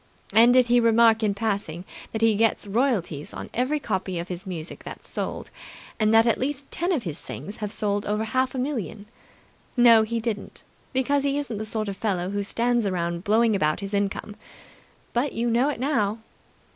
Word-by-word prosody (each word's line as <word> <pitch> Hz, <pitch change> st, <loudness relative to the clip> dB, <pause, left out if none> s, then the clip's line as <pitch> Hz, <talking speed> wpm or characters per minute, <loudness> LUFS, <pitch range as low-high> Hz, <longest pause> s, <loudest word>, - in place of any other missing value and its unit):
And 230 Hz, +2 st, +7 dB
did 255 Hz, 0 st, +5 dB
he 240 Hz, 0 st, +4 dB
remark 230 Hz, -1 st, +5 dB
in 205 Hz, -2 st, +1 dB
passing 200 Hz, -5 st, -2 dB, 0.3 s
that 220 Hz, 0 st, -2 dB
he 225 Hz, -1 st, +5 dB
gets 225 Hz, +1 st, +1 dB
royalties 200 Hz, -, -1 dB
on -, -, -7 dB
every 260 Hz, +5 st, 0 dB
copy 190 Hz, -7 st, -2 dB
of 170 Hz, +1 st, -5 dB
his 180 Hz, +2 st, -6 dB
music 170 Hz, -3 st, -6 dB
that's -, -, -9 dB
sold, -, -, -4 dB, 0.5 s
and 215 Hz, -1 st, +3 dB
that 225 Hz, 0 st, +6 dB
at 230 Hz, -, +2 dB
least 275 Hz, +1 st, -3 dB
ten 350 Hz, +3 st, 0 dB
of 300 Hz, -10 st, 0 dB
his 165 Hz, -4 st, -5 dB
things 205 Hz, -, -8 dB
have 210 Hz, -1 st, -4 dB
sold 205 Hz, -1 st, -1 dB
over 210 Hz, +1 st, 0 dB
half 260 Hz, +3 st, 0 dB
a -, -, -3 dB
million? 230 Hz, -, -3 dB, 0.7 s
No, 235 Hz, -2 st, +7 dB
he 230 Hz, +1 st, -1 dB
didn't, 220 Hz, -3 st, -5 dB, 0.3 s
because 275 Hz, +2 st, +1 dB
he 280 Hz, 0 st, +1 dB
isn't 255 Hz, -8 st, -3 dB
the 215 Hz, -, -3 dB
sort 215 Hz, 0 st, -3 dB
of 200 Hz, -, -3 dB
fellow 190 Hz, -4 st, -1 dB
who 205 Hz, 0 st, -1 dB
stands 235 Hz, +2 st, 0 dB
around 170 Hz, -2 st, -2 dB
blowing 220 Hz, +1 st, +3 dB
about 155 Hz, -5 st, +1 dB
his 200 Hz, 0 st, -6 dB
income. 200 Hz, +1 st, -2 dB, 0.8 s
But 255 Hz, +4 st, 0 dB
you 235 Hz, +1 st, 0 dB
know 245 Hz, +5 st, +3 dB
it 290 Hz, -, -4 dB
now." 230 Hz, -6 st, 0 dB
220 Hz, 195 wpm, -25 LUFS, 200-245 Hz, 0.8 s, And